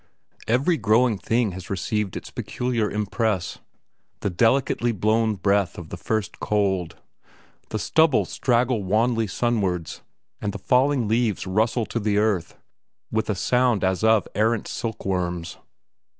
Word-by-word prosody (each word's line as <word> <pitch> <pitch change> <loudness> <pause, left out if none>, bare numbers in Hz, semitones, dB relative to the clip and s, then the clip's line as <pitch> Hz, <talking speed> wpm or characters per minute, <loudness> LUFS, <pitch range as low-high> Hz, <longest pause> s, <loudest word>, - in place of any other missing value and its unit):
Every 135 +9 +2
growing 110 -2 +2
thing 115 -1 +1
has 90 0 -9
received 100 +1 -2
its - - -9
peculiar 120 -4 -2
impress: 105 -2 -1 0.6
the 100 - -1
delicately 120 +4 +2
blown 110 +1 +1
breath 100 0 +1
of 85 -3 -8
the - - -5
first 110 -1 -3
cold. 95 -5 0 0.7
The - - -2
stubbles 160 -4 +2
straggle 120 -2 +1
wanly 115 +3 +1
sunwards, 95 -7 -1 0.4
and 100 -2 -2
the - - -4
falling 130 +3 +2
leaves 110 -1 0
rustle 110 +5 +1
to 115 - -3
the 105 -1 0
earth, 105 -5 0 0.5
with 110 0 -1
a 105 - +1
sound 125 +2 +2
as 95 +2 0
of 110 -1 +4
errant 110 +1 +1
silkworms. 90 -6 -3
110 Hz, 135 wpm, -24 LUFS, 100-120 Hz, 0.7 s, of